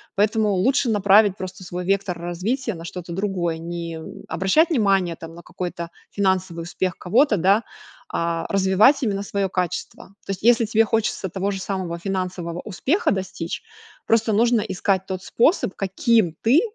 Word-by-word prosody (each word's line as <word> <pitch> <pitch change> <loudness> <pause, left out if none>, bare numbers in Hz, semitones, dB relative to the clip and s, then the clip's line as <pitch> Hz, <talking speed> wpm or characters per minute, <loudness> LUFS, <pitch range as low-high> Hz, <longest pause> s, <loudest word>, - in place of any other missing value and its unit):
Поэтому 210 +1 +2
лучше 245 +7 +2
направить 205 -1 +4
просто 185 0 -7
свой 180 0 -5
вектор 195 -1 0
развития 195 +9 -2
на 165 -2 -9
что-то 175 0 -7
другое. 180 -4 -1
Не, 170 0 -5
м, 160 - -10
обращать 250 - +2
внимание 195 - +2
там 165 0 -10
на 170 - -12
какой-то 170 -1 -6 0.2
финансовый 190 -4 0
успех 180 +2 -3
кого-то, 225 +5 +3
да, 195 +5 +4 0.5
а 165 0 -1
развивать 195 +9 +4
именно 200 -4 0
своё 200 -1 -2
качество. 180 -2 -3 0.2
То - - -4
есть, 195 - -5
если 235 +1 +4
тебе 220 +1 +3
хочется 215 -3 -1
того 195 +3 -2
же 195 - -4
самого 185 -4 -3
финансового 180 -2 -3
успеха 275 - 0
достичь, 185 -3 -4 0.5
просто 225 -1 +3
нужно 235 +1 +3
искать 190 0 -1
тот 190 -1 -4
способ, 235 - +2
каким 195 -1 +2
ты 255 +8 +5
190 Hz, 160 wpm, -22 LUFS, 175-215 Hz, 0.5 s, ты